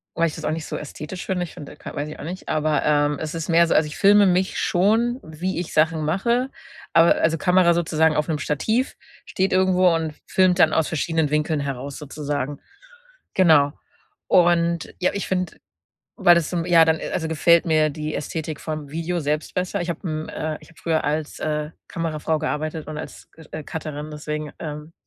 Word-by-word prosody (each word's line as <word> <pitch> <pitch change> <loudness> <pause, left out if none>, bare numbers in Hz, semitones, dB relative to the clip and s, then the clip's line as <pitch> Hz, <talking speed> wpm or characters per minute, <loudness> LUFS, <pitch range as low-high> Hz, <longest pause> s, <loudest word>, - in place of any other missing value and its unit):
weil 170 - +2
ich - - -7
das - - -8
auch - - 0
nicht 155 -1 -3
so - - -4
ästhetisch 150 +4 -7
finde. 180 -2 -1
Ich 175 - -10
finde, 150 -5 -9
da - - -14
ka - - -9
weiß 145 +1 -2
ich 155 - -9
auch - - -8
nicht, 180 +3 -7
aber, 155 -1 +1
ähm, 145 -1 +2
es 155 +1 -4
ist 165 -1 -4
mehr 170 0 +5
so - - +1
also 155 - +4
ich 150 - -8
filme 205 0 +6
mich 185 +1 +1
schon, 225 +7 +2
wie 165 +4 -4
ich 175 - -4
Sachen 160 0 +2
mache, 235 - +1 0.4
aber 165 +1 +6
also 160 0 +2
Kamera 180 +1 +4
sozusagen 160 -2 +2
auf 150 +2 0
'nem 155 - 0
Stativ, 220 - -1 0.3
steht 190 +1 -1
irgendwo 185 -1 +4
und 160 -2 -1
filmt 185 -1 +3
dann 160 -3 +5
aus 160 - +2
verschiedenen 160 -1 0
Winkeln 150 0 0
heraus 140 0 -4
sozusagen. 145 -1 -4 0.8
Genau 155 -6 +5 0.5
und, 170 -1 +3
ja, 180 - +2
ich 200 - -3
finde, 185 -2 -2 0.6
weil 175 - +6
das 170 -2 +1
zum 170 -2 -1
ja, 170 -2 +6
dann, 160 0 +2
äh, - - -5
also 165 -3 -1
gefällt 170 +2 +4
mir 155 -2 +3
die 155 +1 -5
Ästhetik 155 -1 -4
vom 155 -2 -5
Video 165 +3 -2
selbst 150 +1 -2
besser. 185 +2 -1
Ich 175 0 -2
habe 170 +3 -5
'n 155 0 -4
äh, 155 -1 -4
ich - - -17
habe 170 - -21
früher 160 -2 0
als, 150 +1 -2
äh, 150 0 -2 0.2
Kamerafrau 160 -1 -2
gearbeitet 155 0 -3
und 155 -1 -5
als 155 - -9
C 160 - -15
äh, 155 -1 -6
Cutterin, 155 -1 -6
deswegen 150 0 -5
ähm, 150 0 -7
160 Hz, 205 wpm, -23 LUFS, 150-175 Hz, 0.8 s, filme